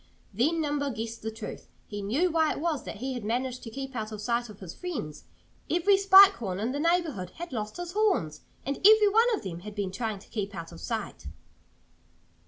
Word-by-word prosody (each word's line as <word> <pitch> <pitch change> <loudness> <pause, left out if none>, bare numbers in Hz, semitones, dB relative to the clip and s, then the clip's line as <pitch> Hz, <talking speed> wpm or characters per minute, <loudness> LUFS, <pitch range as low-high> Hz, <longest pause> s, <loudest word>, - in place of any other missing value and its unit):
Then 305 - +1
Nimble 290 -2 -1
guessed 230 -1 -5
the 220 - -3
truth. 220 0 -8 0.2
He 205 0 -6
knew 275 - +1
why 320 -1 +3
it - - -6
was 315 -3 -1
that - - -6
he 260 +5 -4
had 245 -3 -5
managed 250 +3 -2
to 230 - -8
keep 270 +3 -7
out 220 -1 -3
of 215 - -6
sight 235 +2 -1
of 210 - -12
his 180 -4 -8
friends. 285 - -6 0.4
Every 355 +4 +4
Spike 390 0 +8
Horn 190 -5 -4
in 225 +4 -1
the 285 - -3
neighborhood 320 - 0
had 345 -4 -7
lost 215 -2 -4
his 350 -1 -5
horns! 365 - +1 0.2
And 275 +2 -2
every 425 +1 +7
one 455 +4 +4
of - - -8
them 175 -4 -5
had 210 +3 -9
been 200 -3 -2
trying 215 +1 -3
to 195 - -17
keep 205 -2 -4
out 165 -1 -7
of 80 - -11
sight. 85 - -4
245 Hz, 215 wpm, -28 LUFS, 210-335 Hz, 0.4 s, Spike